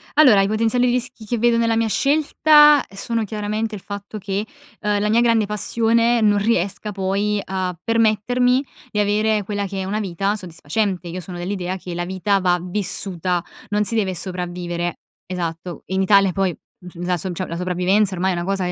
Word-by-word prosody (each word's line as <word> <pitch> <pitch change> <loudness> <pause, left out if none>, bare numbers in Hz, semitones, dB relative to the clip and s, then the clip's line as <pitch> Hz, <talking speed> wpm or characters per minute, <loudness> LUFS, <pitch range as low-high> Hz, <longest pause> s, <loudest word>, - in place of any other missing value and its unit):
Allora, 260 -9 +7
i 195 - +1
potenziali 230 +3 +1
rischi 245 -2 -3
che 240 +2 -1
vedo 235 +1 +3
nella 230 -1 +2
mia 225 0 +1
scelta 295 +2 +5
sono 225 +3 -2
chiaramente 215 +1 -3
il 195 - -7
fatto 200 +2 -7
che, 200 +1 -3 0.4
uhm, 210 -1 0
la 210 - +1
mia 230 +2 +4
grande 230 -3 +3
passione 230 +3 +2
non 210 -1 +3
riesca 205 0 -1
poi 200 +2 -1
a 185 -2 -3
permettermi 230 +3 +2 0.3
di 210 - -3
avere 210 0 +1
quella 205 0 -2
che 195 0 -5
è - - -4
una 210 +3 -2
vita 195 +1 -1
soddisfacente. 180 0 -3
Io 180 +2 -5
sono 175 +1 -8
dell'idea 185 0 -3
che 180 -2 -7
la 175 0 -2
vita 195 +2 0
va 180 -1 +2
vissuta, 180 -2 -2 0.3
non 210 0 +1
si 230 - -1
deve 195 -4 0
sopravvivere, 175 -1 -4 0.3
esatto. 175 -1 -5
In 190 +1 0
Italia, 195 -1 +4
poi, 190 -3 0 0.2
mhmm, 175 -1 -9
la 180 -1 +1
so 185 +2 -4
cioè 185 +2 -4
la 170 - -5
sopravvivenza 185 +3 +1
ormai 185 +1 0
è - - -1
una 175 0 -3
cosa 195 -1 -1
200 Hz, 185 wpm, -21 LUFS, 180-220 Hz, 0.4 s, Allora